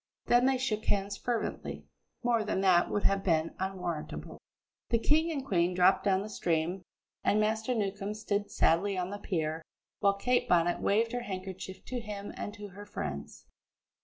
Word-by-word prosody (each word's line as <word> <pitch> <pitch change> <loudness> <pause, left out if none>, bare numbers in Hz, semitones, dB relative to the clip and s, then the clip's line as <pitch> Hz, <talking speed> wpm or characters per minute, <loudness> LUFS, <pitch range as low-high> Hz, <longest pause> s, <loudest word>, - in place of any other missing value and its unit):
Then 245 +2 +5
they 265 -1 +3
shook 220 -4 -1
hands 200 0 0
fervently; 235 +2 -3 0.4
more 235 -2 +2
than 205 -2 -1
that 185 -3 +4
would 205 - -1
have 195 0 +3
been 165 -2 +1
unwarrantable. 185 -4 -4 0.5
The 230 - +4
King 315 +7 +3
and 275 -4 -3
Queen 180 -5 +2
dropped 185 +1 +5
down 195 -1 +3
the - - -6
stream, 175 -1 0 0.4
and 210 - +3
Master 220 +3 +1
Newcombe 200 -1 -2
stood 205 -1 -1
sadly 190 +4 +2
on 180 +1 -2
the 205 - -5
pier, 160 -4 -2 0.4
while 200 0 +3
Kate 250 +5 +1
Bonnet 175 0 +3
waved 225 +3 +2
her 245 - -2
handkerchief 190 -2 -6
to 255 - -3
him 205 -3 -6
and - - -4
to 205 -1 -8
her 205 +2 -11
friends. 70 - -5
200 Hz, 170 wpm, -31 LUFS, 185-220 Hz, 0.5 s, Then